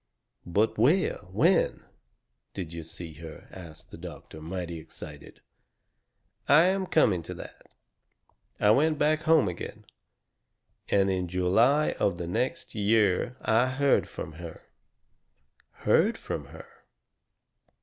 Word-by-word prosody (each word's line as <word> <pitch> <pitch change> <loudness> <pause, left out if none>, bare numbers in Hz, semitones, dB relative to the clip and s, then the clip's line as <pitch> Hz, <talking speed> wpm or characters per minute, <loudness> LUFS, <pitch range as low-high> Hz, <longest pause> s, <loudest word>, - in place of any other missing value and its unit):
"But 105 +5 +1
where 155 - +3
when 165 - +2 0.7
did 85 -4 -6
you 85 -1 -6
see 80 0 -8
her?" 80 -1 -10
asts 85 -5 -10
the - - -13
doctor, 80 - -10
mighty 85 0 -5
excited. 75 -2 -11 1.1
"I 150 +3 +7
am 190 +1 +1
coming 100 - +3
to 90 +2 -8
that. - - -12 0.9
I 105 - +5
went 155 +6 +3
back 155 +1 +2
home 160 -9 +5
again. 90 - -7 1.0
And 100 -1 +3
in 90 -1 -1
July 110 - +3
of 90 -3 +1
the 85 - -4
next 130 - -2
year 105 +2 +1
I 115 +3 +3
heard 140 0 +2
from 80 - -7
her." 85 -2 -9 1.2
"Heard - - +3
from - - -5
her?" - - -12
100 Hz, 120 wpm, -28 LUFS, 85-140 Hz, 1.2 s, I